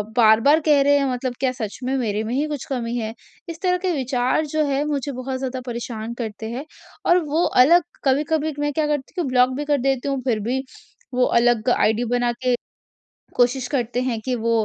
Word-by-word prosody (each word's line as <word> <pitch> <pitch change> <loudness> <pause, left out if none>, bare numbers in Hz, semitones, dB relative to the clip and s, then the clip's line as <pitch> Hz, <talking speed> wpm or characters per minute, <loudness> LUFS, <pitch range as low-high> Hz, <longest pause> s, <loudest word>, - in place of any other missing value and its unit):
बार-बार 230 +6 +5
कह 295 -2 +4
रहे 285 +1 +4
हैं 275 - +1
मतलब 250 0 -2
क्या 260 -1 +1
सच 215 -3 -5
में 260 +2 -1
मेरे 215 -4 -1
में 225 - -3
ही 280 +4 +1
कुछ 295 -3 -5
कमी 240 -3 -2
है? 220 -1 -3 0.4
इस 330 -1 -7
तरह 360 -1 +2
के 370 - +1
विचार 260 +2 0
जो 310 +1 0
है 280 0 0
मुझे 285 -2 -2
बहुत 260 0 -4
ज़्यादा 260 -1 -4
परेशान 235 -2 -5
करते 220 -2 -5
हैं। 260 +5 -5 0.4
और 350 +1 +5
वो 310 +4 +1 0.2
अलग 340 +6 +5 0.2
कभी-कभी 300 +3 +1
मैं 290 0 0
क्या 305 +1 0
करती 295 +4 -3
हूँ 320 - -2
ब्लॉक 250 0 +4
भी 295 - -3
कर 290 -1 +2
देती 270 0 0
हूँ 275 -2 -1
फिर 235 -4 0
भी 265 +1 -1 0.5
वो 250 0 +2 0.2
अलग 240 -1 +2
आईडी 220 0 +2
बना 245 0 +1
के 250 -1 +3 0.8
कोशिश 250 +1 +2
करते 245 -2 -1
हैं 245 -3 -1
कि 255 - 0
वो 230 0 -1
260 Hz, 210 wpm, -22 LUFS, 240-290 Hz, 0.8 s, बार-बार